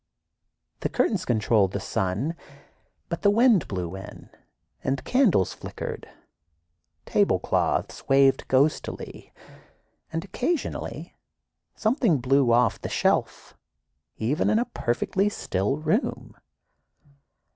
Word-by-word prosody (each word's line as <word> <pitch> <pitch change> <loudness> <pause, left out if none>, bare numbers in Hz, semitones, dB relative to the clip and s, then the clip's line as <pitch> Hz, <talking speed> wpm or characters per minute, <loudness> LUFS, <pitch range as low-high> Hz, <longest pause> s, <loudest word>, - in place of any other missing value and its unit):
The - - -2
curtains 190 -5 0
controlled 110 -4 +2
the 100 - -1
sun, 95 - -2 0.7
but 170 - -4
the 205 - +4
wind 225 - +4
blew 90 -2 -4
in 95 +2 -11 0.5
and 135 0 -1
candles 225 - +2
flickered, - - -7 1.0
tablecloths - - 0
waved 135 0 +4
ghostily, 140 +4 -1 0.8
and 165 +3 -3
occasionally 260 - -3 0.6
something 220 - +2
blew 130 0 +2
off 120 +1 +3
the - - -4
shelf, - - 0 0.6
even 130 +10 0
in - - +3
a 240 - +1
"perfectly 190 - -1
still" 105 - -2
room. 160 - -2
140 Hz, 100 wpm, -25 LUFS, -, 1.0 s, the